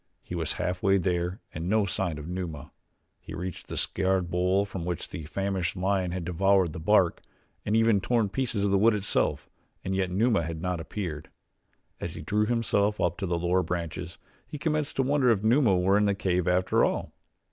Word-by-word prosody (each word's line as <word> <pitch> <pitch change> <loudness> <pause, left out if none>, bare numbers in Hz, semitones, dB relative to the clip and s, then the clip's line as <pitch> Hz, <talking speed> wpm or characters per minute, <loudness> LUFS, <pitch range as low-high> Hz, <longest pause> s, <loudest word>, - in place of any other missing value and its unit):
He - - -8
was 80 -3 -1
half 90 0 -2
way 95 0 +4
there 90 +2 -1
and 80 +3 -4
no 110 0 +3
sign 90 -4 -2
of 75 +1 -7
Numa. 85 -5 -5 0.5
He - - -9
reached 90 +1 -6
the - - -6
scarred 95 -2 0
bole 90 +3 +2
from 95 -4 -6
which 85 -2 -3
the 80 - -7
famished 95 +2 -2
lion 95 0 0
had 90 -1 -4
devoured 90 -1 +2
the - - -6
bark 90 +1 +3 0.5
and 105 - +2
even 115 -3 +4
torn 115 0 +1
pieces 115 -1 -1
of 100 - +1
the 100 - +3
wood 110 +2 +5
itself 105 0 0 0.4
and 95 0 -1
yet 95 -1 0
Numa 105 +2 +2
had 80 0 -4
not 90 0 -2
appeared. 80 -3 -5 0.7
As - - -5
he - - -7
drew 105 +1 +1
himself 105 -3 +1
up 85 0 +1
to 95 - -2
the 85 -1 0
lower 90 +2 +2
branches 85 0 -4 0.3
he 150 - -6
commenced 150 -1 -1
to 135 - +2
wonder 135 -1 +2
if 110 -3 +2
Numa 115 -4 +4
were 95 +3 +3
in 105 - +3
the 100 -1 +2
cave 90 -2 0
after 90 +1 +2
all. - - -1
95 Hz, 200 wpm, -27 LUFS, 90-105 Hz, 0.7 s, wood